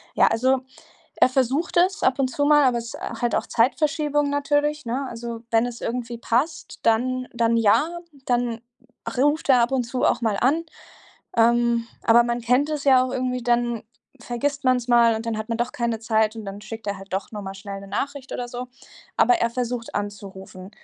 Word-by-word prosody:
Ja, - - +5
also, 260 +3 +2 0.6
er - - +5
versucht 265 +7 0
es 370 +3 +3
ab 260 - +2
und 270 -1 +2
zu 285 - -1
mal, 295 -1 +6
aber 250 -2 +3
es 230 -1 -7
ist - - -8 0.2
halt 240 -2 0
auch - - 0
Zeitverschiebung 295 +3 +1
natürlich, 290 0 0
ne? 260 +4 -2
Also, 235 -1 -6
wenn 225 0 +3
es 240 -1 -7
irgendwie 235 0 -4
passt, 275 +8 -2
dann 255 +3 +1
dann 230 -1 +1
ja, 290 +10 +2 0.3
dann 240 -2 0 0.6
ruft 290 +5 +1
er 255 -2 +6
ab 235 +1 +2
und 260 -2 +1
zu 250 +2 -4
auch 245 - +2
mal 220 -3 +1
an. 300 +7 +2 0.7
Ähm, 235 0 +3 0.2
aber 235 +1 +6
man 240 0 -1
kennt 250 +6 +2
es 300 -2 -3
ja 260 -2 +5
auch 255 - -4
irgendwie, 250 -1 -2
dann 240 -1 0 0.4
vergisst 280 +4 -3
man's 255 -1 +2
mal, 235 -1 +5
und 220 - -5
dann 225 -1 -2
hat 215 - -5
man 230 0 -2
doch 240 +1 -1
keine 235 -2 -2
Zeit, 220 0 +1
und 220 - -7
dann 200 0 -7
schickt 220 +1 -9
er 200 -1 -2
halt 195 0 -13
doch 190 +1 -3
nur 210 -1 -6
mal 195 0 -6
schnell 195 0 -7
'ne 195 - -11
Nachricht 275 +6 -4
oder 245 - -4
so. 245 0 -6 0.5
Aber 370 - +5
er 235 -7 0
versucht 245 -1 -4
anzurufen. 195 -2 -7
240 Hz, 200 wpm, -23 LUFS, 230-265 Hz, 0.7 s, mal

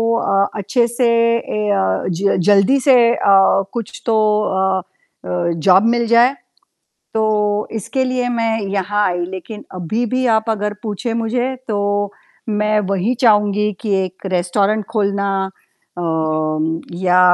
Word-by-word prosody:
अ, 200 -4 +1
अच्छे 235 +4 +1
से 240 +1 0 0.3
ए 215 -2 -4
अ, 95 - 0
ज 190 +3 0
जल्दी 205 +7 +4
से 265 - +7 0.2
अ, - - -7 0.6
कुछ 235 -3 -6
तो 225 -2 +2 0.6
अ - - -6 0.4
अ, 175 -1 -1 0.2
जॉब 190 +1 +6
मिल 235 - 0
जाए। 235 +4 +4 0.8
तो 220 0 +1 0.5
इसके 225 +5 -2
लिए 255 -1 -1
मैं 230 -2 0 0.2
यहाँ 205 +1 0
आई, 175 -1 -2
लेकिन 190 +4 -8
अभी 200 +7 -2
भी 255 0 +1
आप 220 +1 -1
अगर 210 -1 -2
पूछे 225 +2 -4
मुझे 240 +3 -1
तो 210 - -1 0.7
मैं 210 0 +1
वही 200 +5 0
चाहूँगी 210 -3 +3
कि 215 - -2
1 185 +1 -9
रेस्टोरेंट 200 +4 0
खोलना 200 -2 0 0.7
अम, 160 -1 -1 0.2
या 180 0 +4
210 Hz, 135 wpm, -18 LUFS, 185-230 Hz, 0.8 s, से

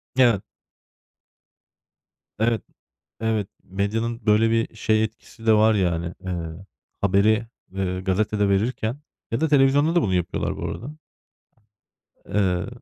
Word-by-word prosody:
Evet. 120 -6 +4 2.0
Evet, 115 0 +2 0.6
evet. 110 -3 0 0.2
Medyanın 110 +4 -2
böyle 110 +2 +4
bir 115 0 0
şey 110 0 +2
etkisi 110 +1 -8
de 110 - +6
var, 110 0 +5
yani, 85 -2 0
eee, 85 +1 -5 0.4
haberi, 105 +3 +3 0.2
eee, 95 -1 -2
gazetede 100 +2 +1
verirken 110 +5 0 0.3
ya 115 +5 -1
da 160 - +3
televizyonda 145 +3 +4
da 175 - +5
bunu 95 - 0
yapıyorlar 90 -2 -1
bu - - -4
arada. 145 +6 -6 1.3
Eee. 95 -2 0
110 Hz, 115 wpm, -24 LUFS, 95-115 Hz, 2.0 s, de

